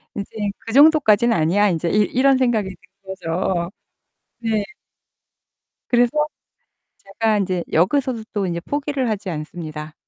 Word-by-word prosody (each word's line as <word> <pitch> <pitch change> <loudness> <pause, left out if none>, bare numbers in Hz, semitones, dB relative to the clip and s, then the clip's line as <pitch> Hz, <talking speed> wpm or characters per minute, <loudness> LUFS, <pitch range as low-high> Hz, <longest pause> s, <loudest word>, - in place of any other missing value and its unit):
이제 200 -1 -5 0.3
그 225 - -8
정도까지는 270 -6 +5
아니야. 185 +6 +3
이제 170 -1 -1
이 210 +4 +3
이런 265 +5 +3
생각이 220 -7 0 0.3
든거죠. 180 -1 -2 0.7
네. 220 -3 0 1.3
그래서 240 -1 +3 0.9
제가 215 +2 -1
이제 185 -3 -1
여기서도 235 - +1
또 205 -3 -1
이제 170 -1 -3
포기를 285 - -2
하지 205 -3 -3
않습니다. 155 -1 -7
205 Hz, 275 characters per minute, -21 LUFS, 175-240 Hz, 1.3 s, 정도까지는